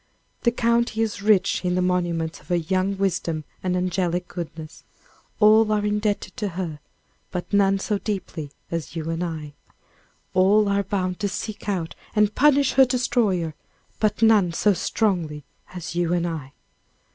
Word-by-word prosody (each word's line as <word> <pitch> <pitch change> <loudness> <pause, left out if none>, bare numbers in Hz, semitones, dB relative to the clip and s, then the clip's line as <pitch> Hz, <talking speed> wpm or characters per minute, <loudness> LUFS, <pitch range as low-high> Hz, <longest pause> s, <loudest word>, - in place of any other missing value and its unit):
The 235 - +3
county 235 -1 +1
is 210 -3 -3
rich 200 -2 +3
in 180 0 0
the 185 - +1
monuments 175 -3 -1
of - - -21
her 180 - +1
young 185 +3 0
wisdom 170 -5 -1 0.2
and 180 -1 0
angelic 180 -1 -1
goodness. 160 -2 -8 0.6
All 215 0 +6
are 210 -1 +1
indebted 210 -2 -1
to 210 -4 -1
her; 165 -5 -3 0.5
but 180 +2 -5
none 195 -1 +4
so 205 +1 -1
deeply 185 -8 -4 0.2
as 165 0 -4
you 165 0 -3
and 165 +2 -2
I. 155 -4 -5 0.8
All 200 +3 +4
are 200 0 +2
bound 185 -2 -2
to 205 - 0
seek 210 +1 -5
out 175 -5 -2 0.2
and 210 0 +3
punish 280 -2 +4
her 265 - +6
destroyer; 235 -10 0 0.5
but 215 +1 +1
none 210 -6 +5
so 205 +4 +3
strongly 170 -6 -1 0.3
as 175 -3 -6
you 175 0 0
and 175 -1 +1
I. 155 -5 -5
190 Hz, 160 wpm, -24 LUFS, 170-210 Hz, 0.8 s, All